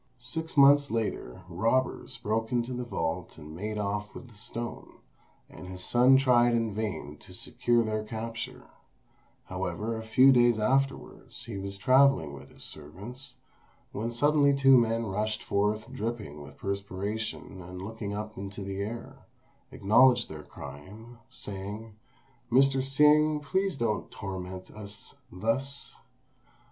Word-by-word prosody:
Six 160 Hz, +6 st, -4 dB
months 140 Hz, 0 st, +7 dB
later 105 Hz, -, -3 dB
robbers 115 Hz, +9 st, 0 dB
broke 110 Hz, +1 st, -1 dB
into 120 Hz, 0 st, 0 dB
the 125 Hz, 0 st, -3 dB
vault 90 Hz, -6 st, -3 dB
and 75 Hz, 0 st, -10 dB
made 105 Hz, +4 st, -4 dB
off 105 Hz, 0 st, -3 dB
with 125 Hz, -, -9 dB
the -, -, -17 dB
stone, 115 Hz, +3 st, -5 dB, 0.5 s
and 90 Hz, -, -11 dB
his 90 Hz, 0 st, -8 dB
son 125 Hz, +5 st, +5 dB
tried 120 Hz, -3 st, +4 dB
in 115 Hz, -2 st, 0 dB
vain 100 Hz, -9 st, -4 dB
to -, -, -15 dB
secure 120 Hz, -1 st, +1 dB
their 110 Hz, -1 st, -2 dB
capture; 115 Hz, +1 st, -6 dB, 0.8 s
however, 115 Hz, +2 st, -3 dB
a 110 Hz, -, -4 dB
few 130 Hz, +5 st, +6 dB
days 120 Hz, -2 st, +5 dB
afterwards, 135 Hz, +5 st, -1 dB
he 115 Hz, -3 st, -6 dB
was 100 Hz, 0 st, -5 dB
travelling 130 Hz, -, +4 dB
with 70 Hz, -, -11 dB
his -, -, -12 dB
servants, 100 Hz, -, -9 dB, 0.6 s
when 110 Hz, +3 st, -3 dB
suddenly 140 Hz, +3 st, +3 dB
two 135 Hz, -1 st, +6 dB
men 115 Hz, -1 st, +3 dB
rushed 110 Hz, +2 st, -2 dB
forth 105 Hz, +2 st, 0 dB
dripping 105 Hz, -9 st, -4 dB
with 70 Hz, -, -12 dB
perspiration, 100 Hz, 0 st, -4 dB
and 90 Hz, +1 st, -8 dB
looking 110 Hz, 0 st, -5 dB
up 105 Hz, 0 st, -5 dB
into 100 Hz, +1 st, -6 dB
the 100 Hz, 0 st, -4 dB
air, 115 Hz, +3 st, -7 dB, 0.4 s
acknowledged 120 Hz, +5 st, +4 dB
their 75 Hz, -1 st, -7 dB
crime, 105 Hz, +11 st, -11 dB
saying, 105 Hz, +3 st, -7 dB, 0.6 s
"Mr. 135 Hz, +2 st, +5 dB
Hsing, 150 Hz, +3 st, +4 dB
please 190 Hz, +4 st, 0 dB
don't 115 Hz, -4 st, -1 dB
torment 95 Hz, -2 st, -7 dB
us 105 Hz, -1 st, -8 dB, 0.2 s
thus! 130 Hz, +9 st, -2 dB
110 Hz, 135 wpm, -29 LUFS, 100-125 Hz, 0.8 s, months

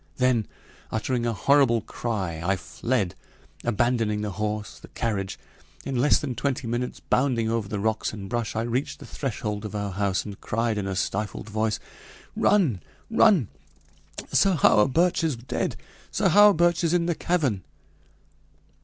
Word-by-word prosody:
Then 125 Hz, -4 st, +2 dB, 0.4 s
uttering 120 Hz, +2 st, -1 dB
a 115 Hz, -, 0 dB
horrible 130 Hz, -1 st, +3 dB
cry, 95 Hz, -8 st, -3 dB
I 95 Hz, +3 st, +2 dB
fled, 100 Hz, +2 st, -2 dB, 0.5 s
abandoning 115 Hz, -2 st, +1 dB
the 105 Hz, -1 st, -3 dB
horse, 105 Hz, +1 st, -4 dB
the -, -, -13 dB
carriage. 100 Hz, -4 st, -3 dB, 0.5 s
In 135 Hz, -, -3 dB
less 130 Hz, +4 st, +4 dB
than 135 Hz, -4 st, -3 dB
twenty 130 Hz, +1 st, -2 dB
minutes, 120 Hz, +2 st, -3 dB
bounding 120 Hz, -4 st, +1 dB
over 115 Hz, -3 st, -1 dB
the 105 Hz, 0 st, -3 dB
rocks 110 Hz, +1 st, 0 dB
and 100 Hz, -2 st, -7 dB
brush, 115 Hz, 0 st, -2 dB
I 110 Hz, -, 0 dB
reached 120 Hz, +4 st, -2 dB
the -, -, -11 dB
threshold 105 Hz, -6 st, -4 dB
of 105 Hz, -1 st, -6 dB
our 100 Hz, -1 st, -2 dB
house, 95 Hz, -1 st, 0 dB
and 100 Hz, -2 st, -8 dB
cried 115 Hz, -1 st, -1 dB
in 100 Hz, -, -3 dB
a 95 Hz, -, -2 dB
stifled 105 Hz, +3 st, -3 dB
voice: 110 Hz, 0 st, 0 dB, 0.6 s
"Run! 150 Hz, -, +3 dB, 0.3 s
Run! 205 Hz, -, +4 dB, 0.8 s
Sir 195 Hz, -2 st, +4 dB
Hawerburch 165 Hz, -, +4 dB
is 155 Hz, -5 st, +1 dB
dead! 120 Hz, +2 st, -3 dB, 0.3 s
Sir 200 Hz, -3 st, +1 dB
Hawerburch 175 Hz, -3 st, +5 dB
is 170 Hz, +1 st, +2 dB
in 170 Hz, -1 st, +2 dB
the 170 Hz, -, +1 dB
cavern 150 Hz, -, 0 dB
115 Hz, 155 wpm, -25 LUFS, 105-135 Hz, 0.8 s, Hawerburch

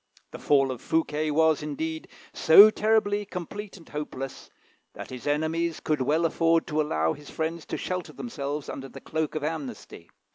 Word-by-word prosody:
The -, -, -8 dB
fall 135 Hz, -2 st, +3 dB
of 125 Hz, -, -7 dB
Fouquet 155 Hz, -1 st, 0 dB
was, 160 Hz, 0 st, +3 dB
indeed, 160 Hz, +2 st, -4 dB, 0.3 s
so 200 Hz, +7 st, +8 dB
terribly 215 Hz, -1 st, +2 dB
complete 200 Hz, +2 st, -7 dB
and 165 Hz, -, -16 dB
hopeless, 135 Hz, -3 st, -6 dB, 0.5 s
that -, -, -8 dB
his 130 Hz, +2 st, -7 dB
enemies 160 Hz, +3 st, 0 dB
could 155 Hz, -3 st, -1 dB
well 155 Hz, +6 st, +2 dB
afford 165 Hz, 0 st, +2 dB
to 155 Hz, 0 st, +1 dB
allow 80 Hz, -, 0 dB
his 145 Hz, 0 st, -12 dB
friends 160 Hz, +1 st, -4 dB
to -, -, -3 dB
shelter 180 Hz, -1 st, -4 dB
themselves 145 Hz, -, -5 dB
under 135 Hz, 0 st, -6 dB
the -, -, -10 dB
cloak 160 Hz, -1 st, -3 dB
of 155 Hz, -, -2 dB
amnesty. 145 Hz, -, -6 dB
155 Hz, 170 wpm, -27 LUFS, 145-165 Hz, 0.5 s, so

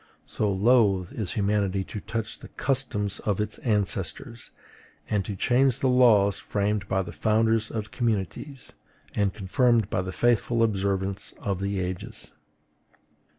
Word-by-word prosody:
So 105 Hz, -2 st, 0 dB
loath 100 Hz, -3 st, +3 dB
is 105 Hz, -6 st, -3 dB
humanity 100 Hz, -2 st, 0 dB
to 105 Hz, -, -7 dB
touch 115 Hz, +2 st, -4 dB
the -, -, -11 dB
customs 125 Hz, -7 st, -1 dB
of 105 Hz, -2 st, -1 dB
its 105 Hz, -, -3 dB
ancestors, 105 Hz, +1 st, -2 dB, 0.6 s
and 105 Hz, -2 st, 0 dB
to 105 Hz, -, -4 dB
change 125 Hz, +5 st, +2 dB
the 130 Hz, -, +2 dB
laws 110 Hz, -6 st, +5 dB
framed 105 Hz, 0 st, -1 dB
by 95 Hz, -1 st, 0 dB
the 90 Hz, -, -8 dB
founders 110 Hz, +6 st, +1 dB
of 105 Hz, -2 st, -5 dB
communities, 120 Hz, -, -3 dB, 0.4 s
and 100 Hz, -2 st, +1 dB
confirmed 110 Hz, +2 st, +1 dB
by 90 Hz, -, +1 dB
the 95 Hz, 0 st, -5 dB
faithful 120 Hz, +2 st, +2 dB
observance 100 Hz, -2 st, -1 dB
of 100 Hz, -2 st, -3 dB
the 100 Hz, 0 st, -1 dB
ages. 90 Hz, 0 st, -5 dB
105 Hz, 140 wpm, -26 LUFS, 95-115 Hz, 0.6 s, laws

